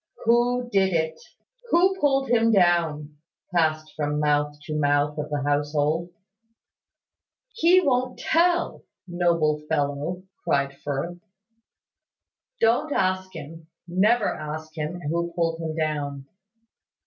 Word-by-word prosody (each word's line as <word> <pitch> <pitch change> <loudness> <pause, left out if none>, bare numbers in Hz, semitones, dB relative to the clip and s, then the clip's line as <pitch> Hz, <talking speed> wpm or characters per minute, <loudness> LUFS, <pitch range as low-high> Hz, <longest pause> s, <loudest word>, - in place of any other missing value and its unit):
"Who 240 +1 +2
did 190 -2 +2
it?" 160 -1 -1 0.5
"Who 370 +2 +4
pulled 270 -2 +2
him 230 -1 +3
down?" 165 -6 +2 0.4
passed 155 -2 +1
from 150 -1 -1
mouth 145 0 +1
to 155 - -6
mouth 145 0 +1
of 150 - -4
the 145 -2 -2
household. 145 +3 0 1.4
"He 370 -5 +5
won't 255 -5 0
tell, 345 +1 +1 0.3
noble 170 -4 +1
fellow," 145 +6 -1 0.2
cried 140 -4 +1
Firth. 145 +6 -4 1.4
"Don't 240 +7 +2
ask 185 -4 0
him. 160 +1 -9 0.2
Never 205 +6 +3
ask 155 +1 -5
him 160 +3 -4
who 170 +2 -2
pulled 165 -1 -1
him 160 -1 -4
down." 145 -3 -2
165 Hz, 115 wpm, -25 LUFS, 150-195 Hz, 1.4 s, He